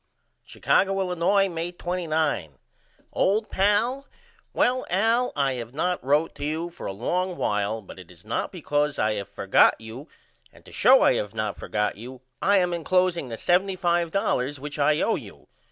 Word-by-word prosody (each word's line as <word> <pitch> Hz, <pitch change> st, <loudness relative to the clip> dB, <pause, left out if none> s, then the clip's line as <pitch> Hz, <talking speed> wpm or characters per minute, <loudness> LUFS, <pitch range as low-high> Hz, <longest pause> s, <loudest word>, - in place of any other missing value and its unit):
Chicago, 195 Hz, 0 st, +1 dB
Illinois, 190 Hz, +2 st, +2 dB
May 170 Hz, -1 st, -4 dB
29. 160 Hz, -, -2 dB, 0.6 s
OLD 215 Hz, +3 st, +1 dB
PAL: 225 Hz, +8 st, +1 dB, 0.4 s
Well 255 Hz, +1 st, +1 dB
Al 225 Hz, +7 st, +2 dB
I 140 Hz, -2 st, +1 dB
have 120 Hz, 0 st, -7 dB
not 180 Hz, +3 st, -1 dB
wrote 145 Hz, +5 st, +1 dB
to 145 Hz, -, -6 dB
you 160 Hz, +4 st, -3 dB
for -, -, -8 dB
a -, -, -3 dB
long 180 Hz, -, -2 dB
while 105 Hz, +1 st, -1 dB
but 95 Hz, -, -12 dB
it 90 Hz, -, -13 dB
is 85 Hz, +1 st, -18 dB
not 110 Hz, -, -2 dB
because 150 Hz, -4 st, -1 dB
I 110 Hz, 0 st, +1 dB
have 100 Hz, -2 st, -5 dB
forgot -, -, +3 dB
you 115 Hz, +7 st, -10 dB, 0.4 s
and -, -, -20 dB
to -, -, -14 dB
show -, -, +5 dB
I -, -, +5 dB
have 105 Hz, +1 st, -4 dB
not 110 Hz, -2 st, -2 dB
forgot 105 Hz, -1 st, -2 dB
you 125 Hz, +3 st, -10 dB, 0.2 s
I 200 Hz, +1 st, +4 dB
am 180 Hz, -2 st, +2 dB
encloseing 175 Hz, -3 st, 0 dB
the 115 Hz, -, -4 dB
$75.00 175 Hz, -, 0 dB
which 145 Hz, +2 st, -8 dB
I 150 Hz, +1 st, +3 dB
owe -, -, +2 dB
you. -, -, -12 dB
160 Hz, 170 wpm, -25 LUFS, 120-185 Hz, 0.6 s, show